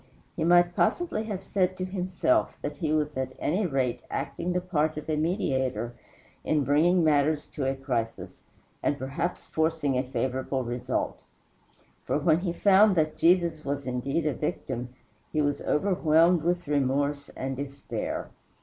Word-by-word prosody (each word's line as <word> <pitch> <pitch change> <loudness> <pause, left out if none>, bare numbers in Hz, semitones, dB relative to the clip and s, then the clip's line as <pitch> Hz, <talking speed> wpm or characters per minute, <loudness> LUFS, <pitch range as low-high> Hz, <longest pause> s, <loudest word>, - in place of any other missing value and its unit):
He - - -2
might 175 +1 +4
possibly 330 -11 +1
have 200 -3 -4
said 185 -1 0
to 185 - -2
himself 185 - 0
that 145 0 -4
he 155 0 -1
was 150 -1 0
at 130 0 -3
any 185 +6 0
rate 130 -5 -1
acting 180 - -3
the 180 - +1
part 155 -4 0
of 155 - -6
a 155 - 0
mediator 130 - -1 0.5
in 150 -2 +1
bringing 165 +6 +3
matters 150 0 +2
to 140 - -3
a 135 - 0
crisis, 125 -4 -4 0.4
and 145 - 0
perhaps 140 +6 -3
forcing 160 -4 0
a - - 0
favorable 130 0 -2
result. 120 0 -2 0.8
For, - - 0
when 155 +2 +3
he 180 -1 -2
found 200 +3 +5
that 155 -2 +1
Jesus 170 -2 +3
was 140 0 -3
indeed 135 +5 -1
a 150 - +1
victim, 120 0 -3 0.4
he 155 - 0
was 145 -1 +1
overwhelmed 170 -1 +3
with 175 +1 -1
remorse 140 0 0
and 135 0 -3
despair. 140 +1 -5
155 Hz, 155 wpm, -27 LUFS, 135-175 Hz, 0.8 s, found